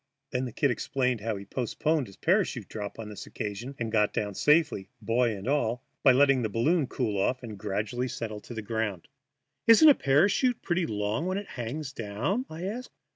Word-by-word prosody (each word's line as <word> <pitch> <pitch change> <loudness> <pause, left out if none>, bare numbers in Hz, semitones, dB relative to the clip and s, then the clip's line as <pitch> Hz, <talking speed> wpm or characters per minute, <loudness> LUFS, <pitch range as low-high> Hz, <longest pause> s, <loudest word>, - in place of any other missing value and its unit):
Then 125 0 -1
the 125 - -5
"Kid" 140 +4 +1
explained 125 -2 -1
how 110 0 -2
he 100 0 -8
postponed 135 +5 -1
his 95 - -14
parachute - - +1
drop 105 -2 -6
on 115 -1 -6
this 105 - -8
occasion 110 +7 -5
and 115 -2 -3
got 105 -2 +2
down 105 -1 -2
safely, 150 - +2
boy 115 +1 +1
and 95 +4 -8
all, 125 -4 0 0.2
by 135 - +7
letting 135 0 +4
the 110 - -1
balloon 135 - +2
cool 105 -7 -1
off 125 +5 0
and 110 -3 -6
gradually 105 +5 -2
settle 110 -3 -5
to 120 - -10
the 110 - -4
ground. 105 -5 -3 0.6
"Isn't 265 +8 +9
a - - +9
parachute 200 - +2
pretty 175 -1 0
long 105 - -1
when 185 +1 -1
it 205 - -6
hangs 135 +4 -5
down?" 125 - -2
I 160 +2 -7
asked. 225 +7 -4
120 Hz, 195 wpm, -28 LUFS, 105-150 Hz, 0.6 s, Isn't